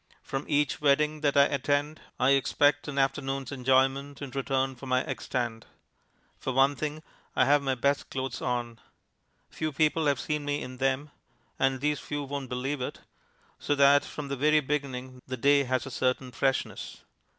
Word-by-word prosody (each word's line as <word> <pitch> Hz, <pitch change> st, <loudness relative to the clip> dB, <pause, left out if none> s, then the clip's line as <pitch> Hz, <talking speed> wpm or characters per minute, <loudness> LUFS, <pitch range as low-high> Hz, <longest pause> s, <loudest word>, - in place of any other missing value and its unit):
From 135 Hz, +1 st, -4 dB
each 150 Hz, -2 st, +1 dB
wedding 150 Hz, +1 st, +2 dB
that 145 Hz, -2 st, +2 dB
I 140 Hz, -, +8 dB
attend 145 Hz, +2 st, 0 dB, 0.2 s
I 130 Hz, +1 st, +4 dB
expect 145 Hz, +1 st, +3 dB
an 145 Hz, -1 st, -5 dB
afternoon's 135 Hz, -1 st, -1 dB
enjoyment 135 Hz, +1 st, +1 dB
in 140 Hz, -2 st, -6 dB
return 135 Hz, 0 st, -1 dB
for 130 Hz, +2 st, -10 dB
my 130 Hz, 0 st, +2 dB
egg -, -, -5 dB
stand. 120 Hz, -3 st, -3 dB, 0.7 s
For 130 Hz, -, -3 dB
one 135 Hz, +2 st, +4 dB
thing 155 Hz, +1 st, -4 dB, 0.3 s
I -, -, +4 dB
have 145 Hz, +1 st, +4 dB
my 135 Hz, -1 st, 0 dB
best 140 Hz, +3 st, 0 dB
clothes 130 Hz, -1 st, -4 dB
on. 120 Hz, -2 st, -2 dB, 0.7 s
Few 155 Hz, -1 st, -3 dB
people 155 Hz, +2 st, +2 dB
have 140 Hz, -3 st, +2 dB
seen 150 Hz, +5 st, -2 dB
me 145 Hz, 0 st, -2 dB
in 125 Hz, 0 st, -8 dB
them 135 Hz, +3 st, 0 dB, 0.5 s
(and 130 Hz, -1 st, +1 dB
these 150 Hz, 0 st, +1 dB
few 145 Hz, -1 st, -4 dB
won't 140 Hz, -2 st, -5 dB
believe 130 Hz, +2 st, -2 dB
it), 125 Hz, -, -5 dB, 0.6 s
so 145 Hz, -, 0 dB
that 140 Hz, 0 st, +6 dB
from 150 Hz, -2 st, -7 dB
the 140 Hz, -, -1 dB
very 150 Hz, +3 st, +4 dB
beginning 130 Hz, -3 st, -4 dB
the 130 Hz, 0 st, -4 dB
day 140 Hz, +2 st, +4 dB
has 130 Hz, -2 st, 0 dB
a 135 Hz, -, -7 dB
certain 130 Hz, +1 st, -1 dB
freshness. 135 Hz, +2 st, -2 dB
135 Hz, 175 wpm, -28 LUFS, 130-145 Hz, 0.7 s, I